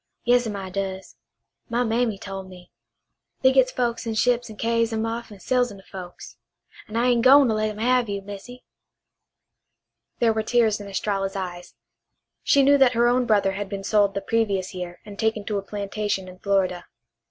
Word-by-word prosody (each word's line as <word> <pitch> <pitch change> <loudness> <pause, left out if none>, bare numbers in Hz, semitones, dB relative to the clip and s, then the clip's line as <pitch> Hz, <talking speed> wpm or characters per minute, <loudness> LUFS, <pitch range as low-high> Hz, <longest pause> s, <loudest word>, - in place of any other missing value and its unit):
Yas'm, 245 -3 +2
I 190 -2 -6
does. 190 -6 -5 0.5
My 240 +1 +1
mammy 225 -2 0
tole 195 0 -6
me. 185 -2 -14 0.7
They 260 - +6
gits 260 -1 +4
folks 235 -2 -2
in 225 - -2
ships 245 +1 +1
and 215 - -10
carries 230 0 +1
'em 220 0 -1
off 230 0 -4
an' 205 - -12
sells 245 +2 +1
'em 200 - -11
to 195 - -15
folks. 180 -2 -10 0.5
An' 215 - -9
I 240 +2 +2
ain' 240 -1 +3
gwine 270 +2 +7
to - - +2
let 215 0 0
'em 210 - -7
have 245 0 +2
you, 200 -1 -3
Missy." 205 +6 -10 1.5
There 230 -2 +3
were 220 - 0
tears 220 -1 +2
in 200 - -8
Estralla's 195 0 -2
eyes. 180 -2 -6 0.7
She 280 - +4
knew 285 +1 +5
that 260 -2 +5
her 235 +1 +3
own 245 0 +2
brother 205 -3 +3
had 200 0 -5
been 195 -1 -5
sold 205 -1 +2
the 200 - -1
previous 200 -5 -1
year 180 -1 -6
and 205 -1 -11
taken 220 -2 0
to 205 -1 -1
a - - -5
plantation 200 -1 -3
in 185 0 -12
Florida. 190 -3 0
215 Hz, 195 wpm, -24 LUFS, 195-235 Hz, 1.5 s, gwine